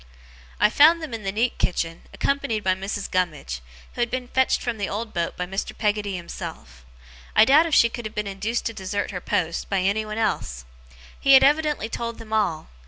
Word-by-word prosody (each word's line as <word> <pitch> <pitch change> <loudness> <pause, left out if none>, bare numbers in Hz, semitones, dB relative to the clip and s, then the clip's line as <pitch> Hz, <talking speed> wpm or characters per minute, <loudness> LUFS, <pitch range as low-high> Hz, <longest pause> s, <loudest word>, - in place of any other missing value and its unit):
I 210 - +4
found 315 +6 +6
them 315 -7 -7
in 225 - -4
the 195 -1 -2
neat 235 +4 0
kitchen, 165 -2 -1
accompanied 275 -6 -1
by 185 - +3
Mrs. 195 +2 -4
Gummidge, 155 - -2 0.3
who - - -4
had 240 - +1
been 255 0 -3
fetched 260 0 +2
from 235 -3 -3
the 200 - -2
old 220 +2 -4
boat 170 -1 -2
by 180 - -2
Mr. 195 +2 -4
Peggotty 205 -2 0
himself. 60 - -8 0.5
I - - +7
doubt 300 +6 +6
if 320 - +1
she 235 - +7
could 235 -1 -6
have 215 - -13
been 210 - -1
induced 200 +4 -3
to 230 - -2
desert 200 0 -3
her 180 -2 -5
post, 165 -1 -1
by 195 -2 +1
anyone 215 +3 -1
else. 75 - -2 0.5
He 275 - +5
had 265 - +9
evidently 295 -3 +2
told 230 0 -4
them 220 -1 -9
all. 170 -8 0
215 Hz, 205 wpm, -24 LUFS, 185-240 Hz, 0.5 s, had